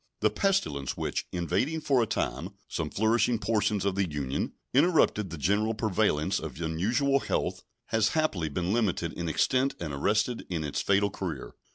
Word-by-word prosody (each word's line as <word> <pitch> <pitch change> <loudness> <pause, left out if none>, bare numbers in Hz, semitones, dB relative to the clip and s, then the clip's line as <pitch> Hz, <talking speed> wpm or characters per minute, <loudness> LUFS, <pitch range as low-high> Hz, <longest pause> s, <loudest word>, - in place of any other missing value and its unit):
The - - +3
pestilence 185 - 0
which, - - -2
invading 95 - 0
for 135 -4 +3
a 115 - +1
time - - -2
some - - -3
flourishing 115 +3 +2
portions 105 -2 0
of 100 - +1
the 95 -2 0
Union, 70 -2 -2 0.2
interrupted 135 - +3
the 85 - -6
general 105 +8 +1
prevalence 105 -8 +1
of - - -7
unusual 110 - +1
health 90 -7 -2 0.3
has 110 -1 +3
happily 95 - +1
been 90 +5 -1
limited 95 -7 0
in 85 -1 -3
extent 130 - +2
and 80 -4 -4
arrested 105 - 0
in 85 -4 -2
its 75 - -2
fatal 100 0 +2
career. - - -5
100 Hz, 165 wpm, -28 LUFS, 85-115 Hz, 0.3 s, The